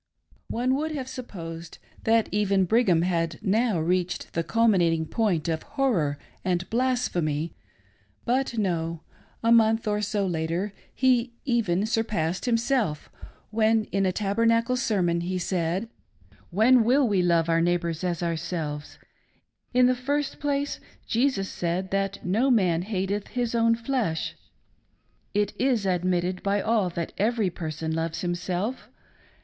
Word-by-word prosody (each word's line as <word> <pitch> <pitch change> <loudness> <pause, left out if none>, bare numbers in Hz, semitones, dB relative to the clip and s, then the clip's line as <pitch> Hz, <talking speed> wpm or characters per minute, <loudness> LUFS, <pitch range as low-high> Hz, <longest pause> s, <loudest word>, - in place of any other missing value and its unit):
One 250 +3 0
would 310 +2 -2
have 265 -4 -4
supposed 170 -10 -8 0.3
that 225 0 +3
even 200 -2 +2
Brigham 185 -5 +3
had 165 -3 0
now 215 -1 +2
reached 180 +2 -1
the 165 - 0
culminating 175 -8 +2
point 180 -5 0
of 160 -1 -1
horror 215 - 0 0.3
and 180 -1 0
blasphemy, 180 - 0 0.7
But 250 -1 0
no; 170 -5 -1 0.2
— - - -33
a 230 - +3
month 225 -1 +4
or 210 0 +1
so 205 -1 0
later 175 +3 -2 0.2
he 250 -2 +2
even 215 -7 +1
surpassed 210 -6 -1
himself 230 - 0 0.4
when 220 0 +3
in 195 -1 +1
a - - +2
Tabernacle 230 +5 +1
sermon 185 -8 +1
he 185 +2 -2
said: 180 +3 -1 0.3
" - - -31 0.3
When 225 +6 +5
will 260 +3 +4
we 200 -4 +2
love 170 -2 +2
our 165 0 +3
neighbors 170 -1 0
as 175 -2 -1
ourselves? 160 -3 -3 0.7
In 250 0 +5
the 255 - +4
first 280 +3 -2
place, 285 -1 -1 0.3
Jesus 235 -5 +1
said 180 +2 -2
that 195 0 -2
no 220 +9 +2
man 185 -9 +3
hateth 195 +1 -2
his 240 -2 -2
own 230 0 +3
flesh. 230 -8 -2 1.0
It 205 0 +1
is 250 -6 +2
admitted 180 0 0
by 200 +1 +1
all 215 -3 +1
that 170 -1 -4
every 215 -2 +1
person 160 -1 -4
loves 165 0 -2
himself. 180 +6 -3
195 Hz, 140 wpm, -26 LUFS, 170-230 Hz, 1.0 s, When